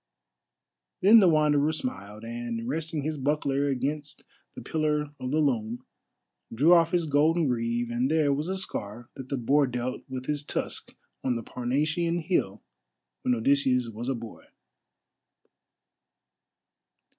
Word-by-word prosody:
Then 215 +4 +8
the 195 - +5
Wanderer 150 -1 +3
smiled, 105 -8 -5
and, 115 0 -5
resting 155 +1 -2
his 155 0 -3
buckler 140 0 0
against 145 +2 -3 0.3
the - - -7
pillar 150 -2 -1
of 125 - -4
the 150 - 0
loom, 120 -5 0 0.7
drew 145 +10 +5
off 165 -2 +5
his 175 -1 +1
golden 155 +3 +3
greave, 120 -1 -1
and 120 +3 0
there 155 -2 +3
was 150 +4 -2
the 190 +1 -2
scar 120 - -6
that 130 -1 -9
the 140 - -1
boar 140 +4 +3
dealt 125 +1 -3
with 130 -1 -5
his 150 0 -1
tusk 145 - -4 0.3
on 125 -2 +1
the 115 - -4
Parnassian 155 +9 -1
hill 155 - -1 0.6
when 125 - +1
Odysseus 125 0 +2
was 115 +3 -5
a 135 - 0
boy. 115 -1 -10
140 Hz, 140 wpm, -27 LUFS, 120-155 Hz, 0.7 s, Then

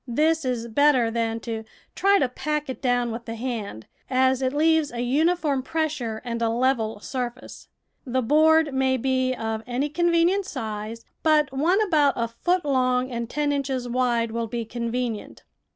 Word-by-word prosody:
This 310 +6 +1
is 240 -2 -2
better 250 -1 +3
than 230 0 -1
to 225 -1 -4 0.3
try 400 +1 +4
to 270 - +2
pack 300 +2 -3
it - - -9
down 245 -2 +1
with 230 +1 -6
the 230 - -5
hand, 220 - -5 0.2
as 260 0 +2
it 260 -1 +1
leaves 315 +1 +2
a 240 0 -4
uniform 295 +2 +1
pres 315 +3 -1
sure 230 -7 -5
and 235 -1 -3
a 230 - +2
level 230 -3 0
surface. 250 0 -6 0.4
The 260 0 -1
board 310 +3 +4
may 265 0 +2
be 260 0 0
of 225 -2 -3
any 255 +4 -1
convenient 345 +4 +2
size, 220 - -5 0.2
but 305 -3 +3
one 330 +9 +2
about 305 -9 +3
a 235 - -1
foot 350 +9 -1
long 255 -2 +1
and 235 -1 -4
ten 295 +1 0
inches 270 -3 -2
wide 240 -2 0
will 230 0 -2
be 230 +1 -4
convenient. 235 -1 -4
255 Hz, 170 wpm, -24 LUFS, 235-295 Hz, 0.4 s, try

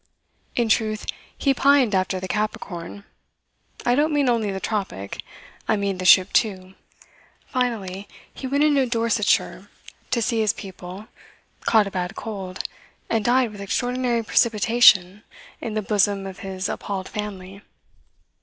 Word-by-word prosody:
In 240 -2 +1
truth, 215 -1 +1 0.3
he 275 - +2
pined 275 -4 +4
after 185 0 +1
the 185 - -5
Capricorn 200 -3 -4 0.8
I 245 - +3
don't 295 +4 +2
mean 290 -3 +2
only 225 -3 +1
the 195 -1 -3
tropic; 190 - -4 0.5
I 220 - +3
mean 200 -2 -2
the 185 - -4
ship 185 +2 +6
too. 190 -4 0 0.7
Finally 205 -6 -2 0.3
he 265 - -6
went 280 +3 +2
into 285 -4 +3
Dorsetshire 230 -3 0 0.4
to 240 -2 +1
see 230 0 0
his 215 -1 +2
people, 190 +1 -9 0.6
caught 220 -2 +4
a 200 - -6
bad 180 +2 -3
cold, 195 -4 -6 0.5
and 225 -2 +1
died 245 0 +3
with 205 -1 -10
extraordinary 245 +3 0
precipitation 210 -4 +4 0.4
in 220 -2 -4
the 215 - -1
bosom 200 -1 +1
of 190 0 -8
his 190 -1 -4
appalled 195 -2 -4
family. 200 -2 -6
210 Hz, 140 wpm, -23 LUFS, 190-235 Hz, 0.8 s, ship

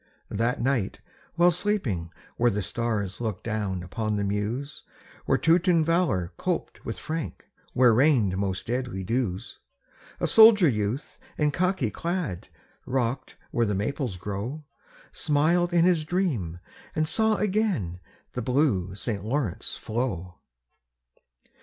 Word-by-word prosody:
That 115 +4 0
night 125 -5 0 0.4
while 175 +1 +5
sleeping 130 - -1 0.2
where 120 +1 +3
the 105 -2 -1
stars 110 -2 -2
Look 110 -5 -3
down 105 -5 -2
upon 110 +4 -2
the 100 - 0
Meuse, 105 +8 -2 0.5
Where - - +4
Teuton 170 0 +3
valor 165 - +1
coped - - -3
with - - -5
Frank, 160 -1 -5 0.3
Where 125 -2 +5
rained 120 -7 +4
most 95 -1 -2
deadly 120 -5 -2
dews, 115 -1 -2 0.6
A - - 0
soldier 220 -5 +8
youth 110 +2 -2 0.2
in 150 -1 +2
khaki 180 - 0
clad, 170 - -3 0.4
Rock'd 125 -1 -1 0.2
where 115 -1 +1
the 105 - 0
Maples 110 0 -2
grow, 105 - -5 0.5
Smiled 170 +4 +2
in 170 -1 +4
his 175 -4 +3
dream 150 - -1 0.4
and 155 0 +1
saw 220 +4 +2
again 190 - 0 0.3
The 125 - -3
blue 110 - +1
St. 100 -2 -3
Lawrence 110 -4 -2
flow. 110 -7 -3
120 Hz, 130 wpm, -26 LUFS, 100-160 Hz, 0.6 s, soldier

